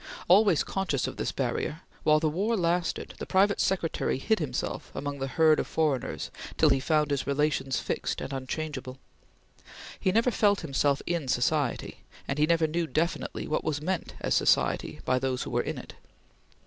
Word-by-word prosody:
Always 190 Hz, -3 st, +5 dB
conscious 190 Hz, -9 st, -1 dB
of -, -, -5 dB
this -, -, -1 dB
barrier, 160 Hz, -, -2 dB, 0.2 s
while 155 Hz, 0 st, +4 dB
the 160 Hz, -, +1 dB
war 200 Hz, +9 st, 0 dB
lasted 170 Hz, -1 st, -1 dB
the -, -, -5 dB
private 200 Hz, +2 st, +3 dB
secretary 180 Hz, -7 st, 0 dB
hid 220 Hz, +10 st, +1 dB
himself 135 Hz, -6 st, -3 dB
among 145 Hz, 0 st, -4 dB
the 135 Hz, -, -2 dB
herd 155 Hz, +3 st, +4 dB
of -, -, -2 dB
foreigners 150 Hz, -5 st, -1 dB, 0.3 s
till 155 Hz, -, +5 dB
he 135 Hz, -1 st, +3 dB
found 150 Hz, +1 st, +1 dB
his 140 Hz, -1 st, -1 dB
relations 140 Hz, -2 st, +1 dB
fixed -, -, -2 dB
and 135 Hz, -, -5 dB
unchangeable. 135 Hz, -1 st, -4 dB, 1.0 s
He 185 Hz, -, +2 dB
never 230 Hz, +5 st, +3 dB
felt 205 Hz, -3 st, +3 dB
himself 140 Hz, -2 st, +1 dB
in 170 Hz, -5 st, -2 dB
society, 130 Hz, +2 st, 0 dB, 0.3 s
and 135 Hz, -, -2 dB
he 150 Hz, -, +4 dB
never 165 Hz, -1 st, +3 dB
knew 165 Hz, +2 st, -1 dB
definitely 165 Hz, +6 st, -2 dB
what 155 Hz, -, -1 dB
was 150 Hz, -2 st, -1 dB
meant 180 Hz, +3 st, -3 dB
as -, -, 0 dB
society -, -, +2 dB
by 130 Hz, -, +2 dB
those 130 Hz, -1 st, -1 dB
who -, -, -6 dB
were -, -, +2 dB
in -, -, -4 dB
it. -, -, -9 dB
155 Hz, 175 wpm, -28 LUFS, 135-175 Hz, 1.0 s, Always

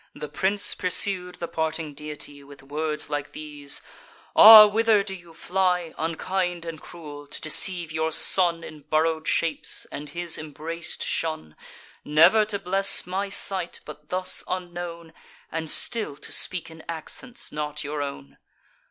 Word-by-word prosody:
The 150 Hz, -, -7 dB
prince 195 Hz, +6 st, +1 dB
pursued 180 Hz, 0 st, +3 dB
the 170 Hz, -, -6 dB
parting 160 Hz, -1 st, -3 dB
deity 145 Hz, -1 st, -8 dB
With 140 Hz, -1 st, -15 dB
words 150 Hz, +1 st, -4 dB
like 145 Hz, 0 st, -4 dB
these: 145 Hz, -2 st, -5 dB, 0.5 s
"Ah! 215 Hz, 0 st, +11 dB
whither 215 Hz, 0 st, +2 dB
do 195 Hz, -1 st, -5 dB
you 175 Hz, -3 st, -12 dB
fly? 180 Hz, -1 st, -1 dB
Unkind 175 Hz, +2 st, -3 dB
and 165 Hz, -2 st, -7 dB
cruel! 145 Hz, -4 st, -11 dB
to -, -, -8 dB
deceive 170 Hz, +1 st, +2 dB
your 160 Hz, 0 st, -2 dB
son 170 Hz, 0 st, +4 dB
In 155 Hz, -, -10 dB
borrow'd 160 Hz, +2 st, -1 dB
shapes, 165 Hz, -2 st, -1 dB
and 145 Hz, 0 st, -7 dB
his 175 Hz, -1 st, -2 dB
embrace 160 Hz, +2 st, -4 dB
to -, -, -4 dB
shun; 80 Hz, -, -3 dB, 0.5 s
Never 170 Hz, +9 st, +5 dB
to 210 Hz, -1 st, -3 dB
bless 195 Hz, 0 st, +1 dB
my 190 Hz, +3 st, -3 dB
sight, 190 Hz, -3 st, -1 dB
but 150 Hz, 0 st, -12 dB
thus 185 Hz, 0 st, +1 dB
unknown; 175 Hz, -2 st, -6 dB, 0.4 s
And 160 Hz, -1 st, -4 dB
still 220 Hz, -7 st, +1 dB
to -, -, -11 dB
speak 175 Hz, -3 st, 0 dB
in 160 Hz, 0 st, -13 dB
accents 200 Hz, +9 st, -5 dB
not 150 Hz, 0 st, -5 dB
your 145 Hz, +1 st, -4 dB
own." 70 Hz, -, -8 dB
165 Hz, 150 wpm, -24 LUFS, 150-185 Hz, 0.5 s, Ah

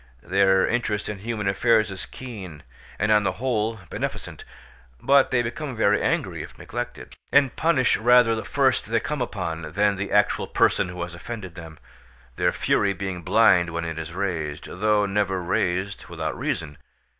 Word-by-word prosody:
Their 95 Hz, +1 st, +3 dB
interest 110 Hz, -4 st, -1 dB
in 105 Hz, -2 st, -5 dB
human 105 Hz, -1 st, -3 dB
affairs 110 Hz, +2 st, +3 dB
is 95 Hz, -, -7 dB
keen, 95 Hz, -, -9 dB, 0.3 s
and 105 Hz, +2 st, +1 dB
on 105 Hz, 0 st, +5 dB
the 95 Hz, -3 st, 0 dB
whole 110 Hz, -1 st, -1 dB
beneficent; -, -, -5 dB, 0.6 s
but 140 Hz, -1 st, +4 dB
they 120 Hz, -2 st, +2 dB
become 130 Hz, +3 st, -5 dB
very 105 Hz, -2 st, +2 dB
angry -, -, -1 dB
if -, -, -10 dB
neglected, -, -, -6 dB, 0.2 s
and 140 Hz, -3 st, +4 dB
punish 150 Hz, -6 st, +2 dB
rather 120 Hz, 0 st, +5 dB
the 110 Hz, -, -3 dB
first 135 Hz, -6 st, +1 dB
they 115 Hz, 0 st, +2 dB
come 150 Hz, +3 st, -3 dB
upon, 85 Hz, -7 st, -4 dB
than 100 Hz, 0 st, +2 dB
the 100 Hz, +1 st, -4 dB
actual 105 Hz, 0 st, +2 dB
person -, -, +2 dB
who 90 Hz, -1 st, -5 dB
has 85 Hz, 0 st, -7 dB
offended 95 Hz, 0 st, -7 dB
them; 80 Hz, -2 st, -10 dB, 0.6 s
their -, -, +2 dB
fury 100 Hz, -1 st, +1 dB
being 95 Hz, -1 st, -5 dB
blind 90 Hz, -2 st, +4 dB
when 85 Hz, 0 st, -3 dB
it 80 Hz, -1 st, -4 dB
is 80 Hz, 0 st, -6 dB
raised, 85 Hz, -5 st, -3 dB
though 105 Hz, +2 st, +1 dB
never 95 Hz, -1 st, 0 dB
raised 90 Hz, +2 st, -1 dB
without -, -, -4 dB
reason. 75 Hz, -3 st, -3 dB
100 Hz, 170 wpm, -24 LUFS, 90-115 Hz, 0.6 s, on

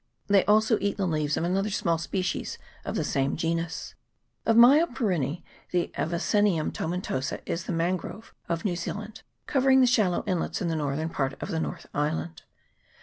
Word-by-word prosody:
They 200 Hz, -2 st, +4 dB
also 215 Hz, +2 st, +4 dB
eat 200 Hz, 0 st, 0 dB
the 195 Hz, -, 0 dB
leaves 155 Hz, -3 st, 0 dB
of -, -, -1 dB
another 195 Hz, +4 st, 0 dB
small 170 Hz, -5 st, 0 dB
species 185 Hz, +2 st, -2 dB, 0.3 s
of -, -, -3 dB
the -, -, 0 dB
same 135 Hz, 0 st, 0 dB
genus. 165 Hz, +1 st, -2 dB, 0.5 s
Of 225 Hz, -, +4 dB
Myoporinece, 235 Hz, -, +4 dB, 0.3 s
the 175 Hz, -1 st, 0 dB
Avicennia 170 Hz, 0 st, +1 dB
tomentosa 160 Hz, -6 st, -3 dB
is 170 Hz, +1 st, -3 dB
the -, -, -3 dB
Man 175 Hz, +2 st, +1 dB
grove 215 Hz, +5 st, -10 dB, 0.2 s
of 170 Hz, +2 st, -2 dB
New 180 Hz, -4 st, +1 dB
Zealand, 210 Hz, +5 st, -5 dB, 0.2 s
covering 265 Hz, -1 st, +4 dB
the 260 Hz, -, +6 dB
shallow 215 Hz, -8 st, +2 dB
inlets 185 Hz, -5 st, -1 dB
in 175 Hz, -, -1 dB
the 165 Hz, -, -1 dB
northern 150 Hz, +1 st, -1 dB
part 135 Hz, -3 st, -2 dB
of -, -, -5 dB
the 160 Hz, -, -1 dB
North -, -, -4 dB
Island. 85 Hz, -, -2 dB
175 Hz, 170 wpm, -27 LUFS, 160-210 Hz, 0.5 s, the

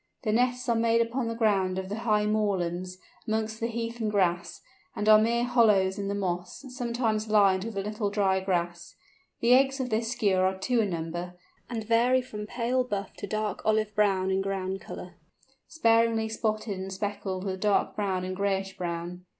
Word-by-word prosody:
The 215 Hz, -, 0 dB
nests 250 Hz, +2 st, +1 dB
are 235 Hz, -, +2 dB
made 230 Hz, 0 st, +3 dB
upon 230 Hz, +1 st, -1 dB
the 230 Hz, -, -3 dB
ground 195 Hz, -5 st, +1 dB
of 190 Hz, 0 st, -3 dB
the 205 Hz, +3 st, -4 dB
high 210 Hz, -2 st, +1 dB
moorlands, 185 Hz, -4 st, -1 dB, 0.3 s
amongst 220 Hz, 0 st, -1 dB
the 230 Hz, -, -1 dB
heath 230 Hz, 0 st, -4 dB
and 215 Hz, -, 0 dB
grass, 175 Hz, -4 st, 0 dB, 0.3 s
and 210 Hz, -, -2 dB
are 215 Hz, 0 st, +8 dB
mere 235 Hz, +2 st, +2 dB
hollows 210 Hz, -6 st, +3 dB
in 200 Hz, -, -3 dB
the 200 Hz, -, -2 dB
moss, 180 Hz, +4 st, -3 dB
sometimes 235 Hz, -3 st, -1 dB
lined 200 Hz, -2 st, +4 dB
with 225 Hz, -3 st, -6 dB
a -, -, 0 dB
little 210 Hz, 0 st, -2 dB
dry 195 Hz, -2 st, +1 dB
grass. 175 Hz, -2 st, -2 dB, 0.5 s
The 235 Hz, +1 st, +5 dB
eggs 270 Hz, +1 st, +4 dB
of 250 Hz, -2 st, -3 dB
this 225 Hz, +1 st, 0 dB
Skua 205 Hz, -6 st, +1 dB
are 190 Hz, +1 st, +2 dB
two 235 Hz, +5 st, +1 dB
in 210 Hz, -, 0 dB
number, 175 Hz, +1 st, -4 dB, 0.3 s
and 230 Hz, -2 st, -3 dB
vary 240 Hz, +3 st, +3 dB
from 210 Hz, -4 st, -7 dB
pale 245 Hz, +3 st, 0 dB
buff 200 Hz, -5 st, -4 dB
to 205 Hz, -, -6 dB
dark 215 Hz, -1 st, -2 dB
olive 215 Hz, -1 st, +1 dB
brown 195 Hz, -2 st, +2 dB
in 190 Hz, 0 st, +1 dB
ground 195 Hz, -1 st, -3 dB
colour, -, -, -9 dB, 0.5 s
sparingly 230 Hz, -5 st, +2 dB
spotted 215 Hz, -2 st, -2 dB
and 190 Hz, 0 st, -5 dB
speckled 190 Hz, -1 st, -3 dB
with 190 Hz, -1 st, -4 dB
dark 210 Hz, -2 st, +1 dB
brown 190 Hz, -3 st, -1 dB
and 185 Hz, 0 st, -4 dB
grayish 195 Hz, 0 st, -1 dB
brown. 175 Hz, 0 st, -5 dB
210 Hz, 190 wpm, -28 LUFS, 190-230 Hz, 0.5 s, are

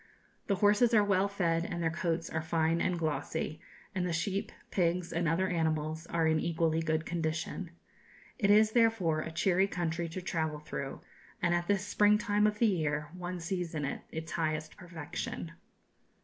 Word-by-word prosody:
The 200 Hz, -, +2 dB
horses 210 Hz, +5 st, +4 dB
are 210 Hz, -, +6 dB
well 200 Hz, -1 st, +3 dB
fed, 170 Hz, -5 st, 0 dB
and 170 Hz, 0 st, -3 dB
their 165 Hz, -, +1 dB
coats 165 Hz, 0 st, -1 dB
are 160 Hz, -, -2 dB
fine 160 Hz, +1 st, +1 dB
and 180 Hz, -, +1 dB
glossy, 155 Hz, -1 st, -2 dB, 0.3 s
and 185 Hz, -3 st, -1 dB
the 180 Hz, -, -1 dB
sheep, 190 Hz, +4 st, -1 dB, 0.2 s
pigs, 175 Hz, -1 st, 0 dB
and 170 Hz, 0 st, 0 dB
other 170 Hz, +4 st, +2 dB
animals 160 Hz, -1 st, -1 dB
are 165 Hz, -1 st, +1 dB
in 160 Hz, 0 st, +3 dB
equally 165 Hz, -1 st, +1 dB
good 160 Hz, 0 st, 0 dB
condition. 165 Hz, +1 st, -2 dB, 0.7 s
It 200 Hz, -4 st, +2 dB
is 215 Hz, +1 st, +6 dB
therefore 225 Hz, -9 st, +3 dB
a 160 Hz, -, -4 dB
cheery 185 Hz, +3 st, +2 dB
country 170 Hz, -2 st, -2 dB
to 165 Hz, -, -5 dB
travel 160 Hz, -4 st, -2 dB
through, 140 Hz, -2 st, -6 dB, 0.4 s
and 175 Hz, 0 st, +2 dB
at 175 Hz, 0 st, 0 dB
this 205 Hz, -1 st, +1 dB
spring 210 Hz, 0 st, +4 dB
time 210 Hz, 0 st, +2 dB
of 210 Hz, 0 st, -1 dB
the 235 Hz, -, +3 dB
year 150 Hz, -7 st, 0 dB
one 180 Hz, 0 st, -5 dB
sees 175 Hz, -1 st, -3 dB
it 150 Hz, -, -2 dB
in 140 Hz, -, -3 dB
its 160 Hz, +1 st, -5 dB
highest 155 Hz, -1 st, -2 dB
perfection. 170 Hz, -1 st, -6 dB
170 Hz, 175 wpm, -31 LUFS, 160-190 Hz, 0.7 s, are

